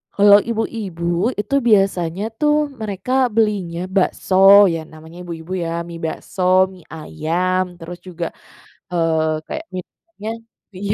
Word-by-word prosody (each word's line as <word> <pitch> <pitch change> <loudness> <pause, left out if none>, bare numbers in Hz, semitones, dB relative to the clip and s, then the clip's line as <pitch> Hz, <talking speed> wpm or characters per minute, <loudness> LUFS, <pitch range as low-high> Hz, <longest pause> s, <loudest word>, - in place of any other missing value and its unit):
Kalau 205 0 +7
ibu-ibu, 205 -3 -2
itu 210 +7 -2
biasanya 195 -5 +2 0.2
tuh 300 -1 +2
mereka 220 +6 0
belinya 210 -7 0 0.2
bakso, 195 +1 +6
ya 165 - -2
namanya 160 +2 -14
ibu-ibu 170 0 -8
ya, 170 0 -3
mie 170 -1 -8
bakso, 160 +4 -5 0.3
mie 180 -3 -16
ayam, 175 +4 -2
terus 175 +1 -8
juga, 175 -2 -5 0.6
eee, 160 -2 +1
kayak 315 +1 -5
minumnya 215 - -8 0.4
iya 200 +2 -2
185 Hz, 120 wpm, -19 LUFS, 170-210 Hz, 0.6 s, Kalau